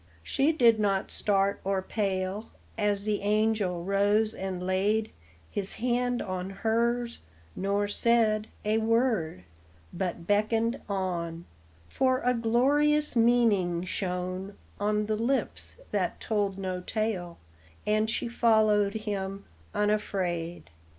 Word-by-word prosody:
She 275 - +2
did 235 -8 +4
not 195 -2 0
start 200 -1 +1
or 195 -1 0
pale 195 +1 -2 0.3
As 205 -2 0
the 210 -1 0
angel 210 -4 +1
rose 205 +3 +2
and 185 -1 -4
laid 205 +4 +1 0.4
His 200 -1 -3
hand 245 +1 0
on 185 0 -4
hers, 235 +4 0 0.4
nor 200 +1 0
said 215 0 +2 0.2
A 215 +1 +2
word, 225 - +1 0.5
hut 175 -2 -3
beckoned 225 +5 +1
on; 175 -4 -3 0.4
For 260 - +1
a 250 - +2
glorious 280 +6 +2
meaning 225 -7 +3
shone 185 +1 -3 0.2
On 210 +1 +1
the 215 0 0
lips 255 +5 -2 0.2
that - - -1
told 205 -3 -1
no 185 -2 -3
tale, 185 -4 -2 0.5
And 215 +1 +2
she 225 - -1
followed 215 -3 +3
him, 200 -2 -4 0.3
unafraid. 185 - -1
210 Hz, 115 wpm, -28 LUFS, 190-225 Hz, 0.5 s, did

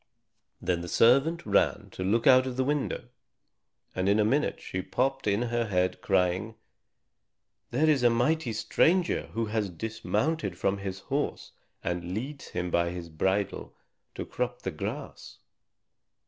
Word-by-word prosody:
Then 90 -2 -1
the 85 - -6
servant 140 - +4
ran - - +2
to 95 - -5
look 110 +5 +1
out 130 0 +6
of 130 -1 -4
the 130 - +2
window, 140 -3 -2 0.8
and 95 +1 0
in 100 +2 +4
a 105 - +4
minute 140 +7 +1
she 95 - -4
popped 135 +5 -1
in 105 +3 +2
her 120 -1 -1
head, 90 -2 0
crying, 95 +3 +1 1.1
"Here 145 +7 +2
is 150 -4 +4
a 120 - +6
mighty 125 +3 +1
stranger 170 - +2
who 115 0 0
has 105 -2 -1
dismounted 110 - -2
from 100 +2 0
his 95 -1 -5
horse 140 +8 -3 0.3
and 90 +1 -3
leads 140 +6 -5
him 90 0 -3
by 85 0 +2
the 85 -1 -6
bridle 95 +5 -1 0.4
to - - -4
crop 125 0 -3
the 95 - -2
grass." 75 - -6
110 Hz, 150 wpm, -28 LUFS, 95-130 Hz, 1.1 s, out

